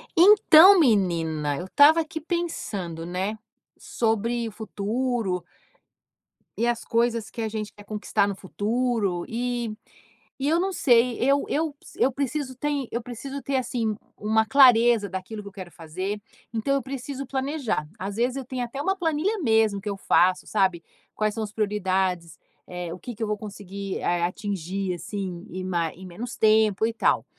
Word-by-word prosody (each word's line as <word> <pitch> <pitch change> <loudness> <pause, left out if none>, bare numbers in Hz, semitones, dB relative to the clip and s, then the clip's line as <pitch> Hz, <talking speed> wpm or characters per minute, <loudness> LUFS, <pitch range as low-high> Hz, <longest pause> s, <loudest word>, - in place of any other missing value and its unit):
Então 380 0 +8
menina, 165 - +1
eu 175 - -5
estava 290 - +6
aqui 315 0 -4
pensando, 210 - -3
né, 190 +5 -3 0.4
sobre 230 +1 -1
o - - -6
futuro 215 -2 -2 1.1
e 230 - +1
as 240 -1 0
coisas 230 -1 0
que 235 - -6
a - - -1
gente 215 -1 -4
quer 205 - -15
conquistar 205 -1 0
no 200 - -3
futuro 205 -2 -1
e 240 -1 -2 0.7
e 270 - -1
eu 325 +3 +3
não 380 +2 0
sei, 240 -6 +3
eu 275 +2 +2
eu 315 +1 0
p 285 - -26
eu 265 - +3
preciso 275 0 -3
tem 285 0 -2
eu 235 - -2
preciso 265 +4 -7
ter, 275 - -2
assim, 235 -4 -1 0.2
uma 220 +1 +2
clareza 235 -4 +5
daquilo 190 +3 -6
que - - -11
eu - - -20
quero 185 -3 -9
fazer, 185 +6 -5 0.3
então 230 +5 0
eu 275 - 0
preciso 270 +1 -5
planejar. 265 - -2
Às 195 +2 -5
vezes 245 +3 0
eu 270 - -5
tenho 255 0 -3
até 240 +3 -7
uma 385 +6 +1
planilha 350 +5 0
mesmo 220 -6 +2
que 210 - -4
eu 200 - -3
faço, 185 -1 +3
sabe. 190 -5 +1 0.3
Quais 215 -1 0
são 220 +1 -3
as 210 - -6
prioridades, 190 -5 -1 0.3
eh, 180 -2 -5
o 180 - -9
que 240 +4 -7
que 225 - -4
eu - - -1
vou 210 - 0
conseguir, 200 -2 -6
eh, 175 0 0
atingir, 190 0 -2
assim, 180 +1 -6
em 185 +1 -5
ma 170 -3 -1
em 190 - -12
menos 225 +8 -7
tempo 220 -1 +4
e 230 - -3
tal. 225 - +1
220 Hz, 175 wpm, -25 LUFS, 190-255 Hz, 1.1 s, Então